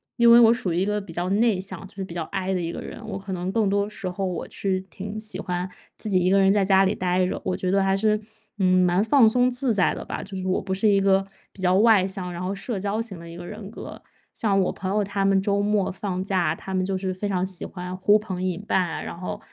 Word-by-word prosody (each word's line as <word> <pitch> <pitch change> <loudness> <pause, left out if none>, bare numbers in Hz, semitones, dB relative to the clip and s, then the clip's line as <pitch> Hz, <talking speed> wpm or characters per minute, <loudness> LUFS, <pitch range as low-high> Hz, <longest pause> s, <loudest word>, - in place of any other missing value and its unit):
因 235 -1 +6
为 235 - +9
我 230 0 +7
属 220 -8 -2
于 - - -1
一 190 - +1
个 210 0 -1
比 190 -4 -11
较 175 +2 -2
内 210 -2 +3
向， 190 0 -7
就 - - -20
是 195 - -4
比 170 - -9
较 170 -2 -2
I 190 +2 -2
的 180 - -1
一 165 0 -3
个 - - -6
人， 230 - -8
我 195 - -3
可 195 -1 -6
能 180 +1 -3
更 215 -3 +1
多 200 +1 +1
时 195 - -6
候 190 +2 -3
我 180 -3 -3
是 190 -2 -1
挺 205 +2 -6
喜 215 0 -5
欢 180 0 -3 0.3
自 215 - -3
己 185 -2 +3
一 180 +1 +2
个 195 - +4
人 195 0 +5
在 205 -2 +3
家 195 0 +4
里 195 - +1
呆 180 0 +1
着， - - -4
我 185 - -1
觉 185 - -2
得 195 0 +3
还 195 0 +2
是， 215 0 +2 0.4
嗯， 185 -1 +4
蛮 180 +3 +2
放 230 0 +5
松 250 +3 +3
自 245 -1 0
在 190 -3 +2
的 - - -6
吧， - - -5
就 195 -1 -7
是 185 0 -4
我 185 - +1
不 190 0 -3
是 195 +3 +1
一 200 -1 +4
个 195 0 +3 0.3
比 190 - -12
较 180 0 +3
外 210 -2 +5
向， 185 -2 -5
然 175 +1 -6
后 190 - -2
社 200 0 -4
交 205 +3 -1
型 200 -7 -8
的 170 0 -10
一 165 - -9
个 175 - -8
人 205 0 -8
格， - - -9 0.3
像 200 -3 +1
我 180 - +1
朋 185 - -5
友， 210 - +2
他 200 0 -2
们 195 -1 +3
周 200 0 +1
末 205 -2 +1
放 185 -1 -3
假， 180 -5 +1
他 190 - -7
们 185 0 +1
就 190 -1 -1
是 185 0 -2
非 205 +3 -3
常 185 -1 0
喜 185 -2 -5
欢 180 0 -6
呼 205 +3 +4
朋 190 -4 -5
引 185 0 -2
伴 190 - +3
啊， - - -4
然 - - -7
后 180 - -5
195 Hz, 310 characters per minute, -24 LUFS, 185-205 Hz, 0.4 s, 为